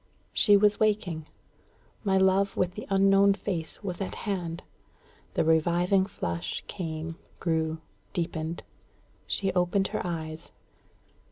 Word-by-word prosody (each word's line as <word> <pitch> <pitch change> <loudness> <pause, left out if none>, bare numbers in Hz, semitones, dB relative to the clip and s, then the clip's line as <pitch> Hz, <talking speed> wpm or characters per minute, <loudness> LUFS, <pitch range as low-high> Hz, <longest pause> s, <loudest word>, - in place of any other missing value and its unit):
She 205 -2 +7
was 205 0 +4
waking. 195 -8 0 0.8
My 195 -2 +2
love 190 +1 +3
with 180 -1 +1
the 210 - -7
unknown 195 0 +5
face 180 -3 -4
was 185 -1 -4
at 195 - -3
hand. 175 -5 -3 0.7
The - - +2
reviving 175 +4 +3
flush 85 - -4
came, 165 -2 -5 0.2
grew, 160 -1 0 0.3
deepened. 165 -2 -3 0.6
She 195 -2 0
opened 185 +2 +1
her - - -2
eyes. 160 -2 -5
180 Hz, 115 wpm, -28 LUFS, 160-195 Hz, 0.8 s, She